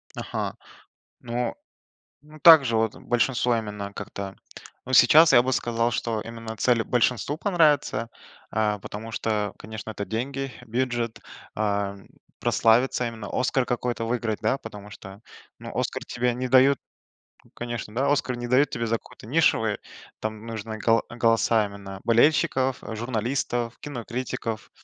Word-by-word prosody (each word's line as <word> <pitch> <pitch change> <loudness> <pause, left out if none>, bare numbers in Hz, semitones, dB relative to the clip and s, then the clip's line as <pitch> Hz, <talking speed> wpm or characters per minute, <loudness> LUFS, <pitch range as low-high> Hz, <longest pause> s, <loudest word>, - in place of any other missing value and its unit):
Ага. - - -4 0.7
Ну, 120 +1 -2 0.7
ну 150 +1 -15
также, 145 -9 +8
вот, 110 -1 0
большинство 120 0 +1
именно 105 -2 -5
как-то, 100 -1 -6 0.5
ну, 130 - -6
сейчас 155 +7 +7
я 120 - +7
бы 130 - -1
сказал, 120 -1 0
что 115 -1 -2
именно 115 -1 -7
цели 120 0 +2
большинству 125 +4 0
понравиться, 150 - +2 0.4
э, 105 -1 +1
потому 110 +2 -7
что, 115 - -2 0.2
э, - - -35
конечно, 110 +1 -7
это 100 -1 -4
деньги, 135 +5 -3
бюджет 120 -1 -2 0.4
э, 100 -1 -1 0.4
прославиться 120 +2 +3
именно, 110 -3 -6
"Оскар" 130 +1 +1
какой-то 120 -1 -2
выиграть, 115 -2 -2
да? 110 +5 +1
Потому 105 -3 -10
что, 95 0 -11 0.4
ну, - - -8
"Оскар" - - -2
тебе 125 -1 -1
не 130 +1 -3
дают 130 +2 +5 0.8
конечно, 120 -3 -5
да, 135 +3 +2
"Оскар" 130 -3 0
не 120 0 -5
дают 135 +3 +3
тебе 115 -2 -2
за 115 - +1
какую-то 110 - -15
нишевую, 115 -7 +2 0.4
там 110 0 -5
нужны 110 -1 -5
го 115 0 +3
голоса 115 -2 +2
именно 100 -1 -9
болельщиков, 130 +1 +3
журналистов, 120 +1 -2
кинокритиков. 120 -4 -5
115 Hz, 140 wpm, -25 LUFS, 110-125 Hz, 0.8 s, также